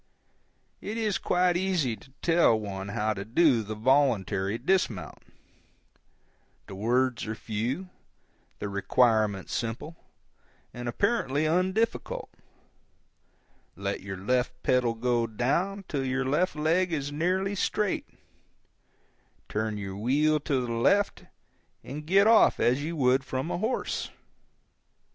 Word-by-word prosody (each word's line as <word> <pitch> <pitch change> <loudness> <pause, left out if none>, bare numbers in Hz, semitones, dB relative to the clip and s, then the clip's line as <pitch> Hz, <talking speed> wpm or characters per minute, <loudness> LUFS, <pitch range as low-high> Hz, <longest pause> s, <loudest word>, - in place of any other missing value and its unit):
It 215 +2 -5
is 215 -3 0
quite 180 0 +2
easy 175 -10 0
to 110 +6 -19
tell 165 -10 +4
one 100 -2 -5
how 105 +2 -1
to 100 -1 -5
do 120 +2 +3
the 110 0 -6
voluntary 110 -5 +2
dismount; 120 - -1 1.5
the - - -10
words 120 +4 0
are 110 - -3
few, 120 - -3 0.7
the - - -4
requirement 105 0 +2
simple, 120 +8 -4 0.8
and 120 0 -5
apparently 155 - 0
undifficult; 185 +8 0 1.5
let 100 +1 -3
your 95 0 -6
left 125 +5 -1
pedal 125 -2 +2
go 120 0 0
down 175 - -1
till 140 -4 -2
your 130 0 -1
left 150 +6 +1
leg 165 +4 +1
is 145 -3 -2
nearly 185 +6 0
straight, 205 0 -1 1.4
turn 110 0 -2
your 95 -1 -5
wheel 145 +8 +2
to 135 -3 -1
the 120 - -3
left, 200 +13 +2 0.6
and 150 +3 -7
get 195 +3 +5
off 225 0 +5
as 125 +4 +2
you 165 +2 -3
would 130 -2 +3
from 135 +5 -3
a - - -2
horse. 225 +5 -2
130 Hz, 120 wpm, -28 LUFS, 110-175 Hz, 1.5 s, get